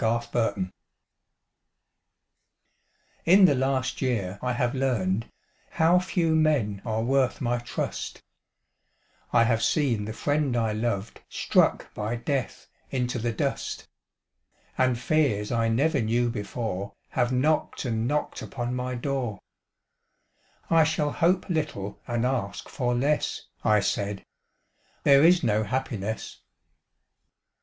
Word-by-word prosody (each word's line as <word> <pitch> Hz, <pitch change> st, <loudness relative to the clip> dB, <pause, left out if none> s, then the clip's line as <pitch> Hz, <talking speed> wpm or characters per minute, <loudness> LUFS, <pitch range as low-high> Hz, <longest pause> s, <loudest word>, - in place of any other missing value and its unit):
Red 115 Hz, +1 st, 0 dB
Maples 100 Hz, -5 st, +1 dB, 2.6 s
In 190 Hz, +3 st, +7 dB
the 155 Hz, -, +5 dB
last 130 Hz, -1 st, -1 dB
year 100 Hz, -7 st, -1 dB
I 125 Hz, 0 st, -1 dB
have 120 Hz, 0 st, 0 dB
learned 115 Hz, -6 st, 0 dB, 0.4 s
How 165 Hz, +3 st, +4 dB
few 175 Hz, -3 st, 0 dB
men 145 Hz, -11 st, +2 dB
are 110 Hz, -1 st, -1 dB
worth 130 Hz, +1 st, +1 dB
my 120 Hz, -2 st, 0 dB
trust; 120 Hz, -, -4 dB, 1.1 s
I 115 Hz, -, +5 dB
have 115 Hz, 0 st, +2 dB
seen 120 Hz, -10 st, +1 dB
the 110 Hz, -, -5 dB
friend 145 Hz, -1 st, 0 dB
I 115 Hz, -2 st, +1 dB
loved 110 Hz, -2 st, -2 dB
Struck -, -, +1 dB
by 105 Hz, +3 st, -2 dB
death 130 Hz, +2 st, -3 dB, 0.2 s
into 125 Hz, -1 st, -1 dB
the 120 Hz, +1 st, -1 dB
dust, 110 Hz, -, -3 dB, 0.9 s
And 130 Hz, -2 st, +2 dB
fears 120 Hz, -6 st, +1 dB
I 115 Hz, -1 st, +1 dB
never 140 Hz, +5 st, +2 dB
knew 120 Hz, +2 st, +1 dB
before 105 Hz, -3 st, -4 dB, 0.2 s
Have 120 Hz, 0 st, 0 dB
knocked 145 Hz, +3 st, +1 dB
and 115 Hz, -1 st, -1 dB
knocked 150 Hz, +3 st, -1 dB
upon 120 Hz, -1 st, -4 dB
my 125 Hz, 0 st, -3 dB
door 120 Hz, -5 st, -2 dB, 1.3 s
"I 165 Hz, -1 st, +5 dB
shall 155 Hz, -2 st, 0 dB
hope 175 Hz, +4 st, +2 dB
little 150 Hz, -, -3 dB
and 120 Hz, 0 st, 0 dB
ask 120 Hz, -7 st, -2 dB
for 125 Hz, -3 st, -1 dB
less," 145 Hz, +5 st, 0 dB, 0.2 s
I 105 Hz, -1 st, +4 dB
said, 100 Hz, 0 st, -2 dB, 0.8 s
"There 140 Hz, 0 st, +6 dB
is 175 Hz, +2 st, +5 dB
no 110 Hz, -3 st, +2 dB
happiness." 110 Hz, -3 st, -3 dB
120 Hz, 120 wpm, -26 LUFS, 110-140 Hz, 2.6 s, In